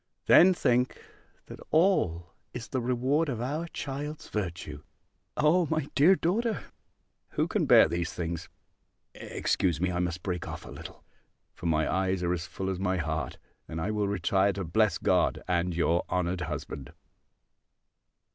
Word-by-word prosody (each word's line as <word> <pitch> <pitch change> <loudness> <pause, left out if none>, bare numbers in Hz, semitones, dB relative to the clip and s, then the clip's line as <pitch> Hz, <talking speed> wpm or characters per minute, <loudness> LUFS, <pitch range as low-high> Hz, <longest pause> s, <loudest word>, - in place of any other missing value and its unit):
Then 185 +1 +7
think, 125 -4 +1 0.5
that - - -10
all 90 - +2 0.2
is 115 - -6
the 130 - -1
reward 130 +6 +1
of 120 -4 -3
our 150 +8 -2
child's 145 0 -6
virtue! 85 -7 -4 0.6
O 160 +3 +3
my 155 -2 -1
dear 165 +7 +6
daughter, 215 +6 0 0.7
who - - +1
can - - 0
bear - - +8
these 85 0 -2
things! 85 -1 -4 0.6
Excuse 85 -5 -1
me! 90 +1 0
I 85 - -2
must 85 -1 -2
break 90 -3 -3
off - - -7
a - - -10
little! - - -10 0.5
For 85 - -5
my 80 -1 +2
eyes 95 -1 0
are 90 0 +1
as 85 +1 -4
full 95 0 -3
as 90 - -4
my 95 -1 0
heart: 80 -4 -3 0.3
and 80 - -5
I 100 +6 -1
will 105 -1 0
retire 100 0 +2
to 95 - -4
bless 100 +3 +2
God, - - +1
and 90 -1 0
your 85 0 +2
honoured 90 0 -1
husband. 75 -4 -5
95 Hz, 155 wpm, -28 LUFS, 85-135 Hz, 0.7 s, bear